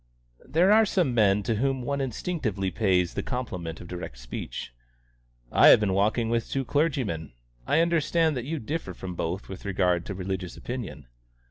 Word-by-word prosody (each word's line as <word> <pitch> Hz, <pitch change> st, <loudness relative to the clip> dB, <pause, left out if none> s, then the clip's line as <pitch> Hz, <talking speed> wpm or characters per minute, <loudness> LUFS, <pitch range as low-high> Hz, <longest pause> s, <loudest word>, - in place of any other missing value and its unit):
There 175 Hz, +6 st, +4 dB
are 220 Hz, +1 st, +7 dB
some 180 Hz, -, +1 dB
men 105 Hz, -3 st, +3 dB
to 110 Hz, +1 st, 0 dB
whom 135 Hz, +1 st, 0 dB
one 140 Hz, +2 st, -1 dB
instinctively 120 Hz, -, -2 dB
pays 90 Hz, -3 st, +2 dB
the -, -, -2 dB
compliment 90 Hz, -11 st, -4 dB
of -, -, -10 dB
direct 90 Hz, -8 st, -7 dB
speech. -, -, -6 dB, 0.8 s
"I -, -, +7 dB
have -, -, +9 dB
been 105 Hz, -3 st, +1 dB
walking 110 Hz, +4 st, +2 dB
with 115 Hz, -1 st, 0 dB
two 135 Hz, -1 st, -1 dB
clergymen. 130 Hz, -, -1 dB, 0.3 s
I 160 Hz, -, +4 dB
understand 165 Hz, -1 st, +2 dB
that 125 Hz, -1 st, -3 dB
you 160 Hz, +3 st, -2 dB
differ 140 Hz, -, -4 dB
from 90 Hz, 0 st, -6 dB
both 85 Hz, +3 st, -3 dB
with 95 Hz, +1 st, -8 dB
regard 90 Hz, -3 st, +1 dB
to 100 Hz, -, -4 dB
religious 95 Hz, -1 st, -4 dB
opinion." 120 Hz, -, -6 dB
110 Hz, 170 wpm, -27 LUFS, 90-140 Hz, 0.8 s, have